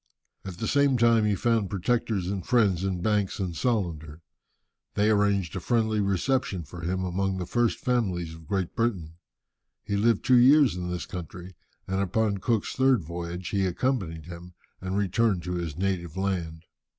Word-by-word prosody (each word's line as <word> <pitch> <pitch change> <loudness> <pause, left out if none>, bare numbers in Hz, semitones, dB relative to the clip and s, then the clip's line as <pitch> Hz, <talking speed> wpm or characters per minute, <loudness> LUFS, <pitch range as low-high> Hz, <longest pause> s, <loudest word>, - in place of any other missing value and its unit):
At 95 -3 -7
the 110 - -3
same 140 -2 +3
time 115 -2 +4
he 105 -1 +2
found 115 -2 +1
protectors 105 -1 -1
and 95 -1 -3
friends 100 -7 +2
in 95 -2 -2
Banks 105 -2 0
and 90 -4 -3
Solander. 85 - -2 0.7
They 105 +1 +3
arranged 100 -5 +1
a - - -2
friendly 110 -3 +1
reception 100 +1 0
for 85 +4 -10
him 95 +2 -2
among 95 +1 -1
the 90 - -3
first 120 +5 +1
families 95 -10 -1
of 80 -1 -13
Great 95 -1 -2
Britain. 95 -9 -2 0.7
He 100 - -2
lived 110 +1 +2
two 125 -1 +6
years 135 - +6
in 90 -1 -4
this 90 -1 -3
country, 90 +1 -8 0.3
and 95 +1 -1
upon 100 +1 0
Cook's 110 +1 0
third 130 -6 +3
voyage 85 +2 -5
he 100 -2 +1
accompanied 90 - -2
him, 90 +1 -10 0.3
and 95 +1 -3
returned 100 -2 +1
to 90 - -3
his 85 -4 -4
native 90 -3 -2
land. 85 -5 -2
95 Hz, 170 wpm, -27 LUFS, 90-110 Hz, 0.7 s, two